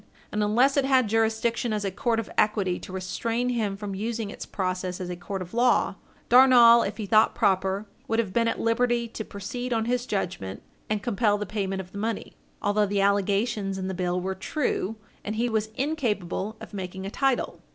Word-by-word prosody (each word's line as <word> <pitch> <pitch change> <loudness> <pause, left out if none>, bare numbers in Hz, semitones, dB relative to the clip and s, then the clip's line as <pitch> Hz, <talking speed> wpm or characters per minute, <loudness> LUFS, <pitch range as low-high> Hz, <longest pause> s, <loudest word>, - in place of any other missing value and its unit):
And 210 - -1
unless 245 +7 +3
it 280 - +4
had 260 -3 +4
jurisdiction 225 +2 +1
as 210 -1 -1
a 195 - -1
court 225 +4 0
of 225 - -4
equity 200 -4 +1
to - - -10
restrain 230 +6 -2
him 215 -5 -1
from 205 -1 -5
using 220 +1 -3
its - - -8
process 185 -2 -2
as 180 -1 -4
a - - -3
court 190 +2 -5
of 175 - -14
law, 245 +2 +3 0.3
Darnall, 240 -2 +8
if 200 -1 -3
he 215 - -3
thought 215 +2 +4
proper, 190 +1 +1 0.2
would 225 - 0
have 215 -5 0
been 230 -1 +2
at - - -1
liberty 235 +1 +1
to 220 - -5
proceed 245 +6 -5
on 225 -1 +1
his 245 +1 -1
judgment, 170 - -3 0.3
and 210 -1 -1
compel 215 -2 +2
the 210 - -3
payment 195 -2 -2
of 185 -1 -13
the 200 - -7
money, 220 0 -3 0.3
although 205 0 +2
the 200 0 0
allegations 200 0 +1
in 190 0 -3
the 190 - -3
bill 180 0 -1
were 190 +1 -2
true 220 0 -2 0.3
and 210 - -3
he 235 +2 +1
was 220 -2 -1
incapable 220 - -2
of - - -11
making 190 -1 -5
a 195 - -4
title. 270 0 0
210 Hz, 205 wpm, -26 LUFS, 195-235 Hz, 0.3 s, Darnall